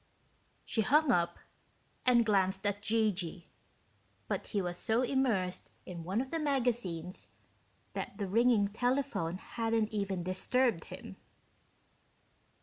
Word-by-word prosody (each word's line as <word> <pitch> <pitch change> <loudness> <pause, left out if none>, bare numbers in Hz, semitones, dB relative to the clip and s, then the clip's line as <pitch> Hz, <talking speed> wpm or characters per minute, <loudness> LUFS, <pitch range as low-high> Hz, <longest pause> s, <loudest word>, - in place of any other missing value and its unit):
She 225 - 0
hung 290 +6 +4
up 175 -5 +2 0.7
and 240 -2 +6
glanced 190 -2 +2
at 205 0 0
G.G., 200 -6 0 0.8
but - - -2
he 205 - -1
was 175 -2 -2
so 230 +5 +2
immersed 235 -9 0 0.2
in 175 -2 -7
one 190 +7 0
of 265 - -6
the 330 - -1
magazines 235 - -1 0.7
that 200 - -5
the 205 - -2
ringing 225 0 +4
telephone 245 -7 0
hadn't 225 +1 -1
even 195 -4 -1
disturbed 190 +2 +1
him. - - -9
210 Hz, 120 wpm, -32 LUFS, 185-245 Hz, 0.8 s, and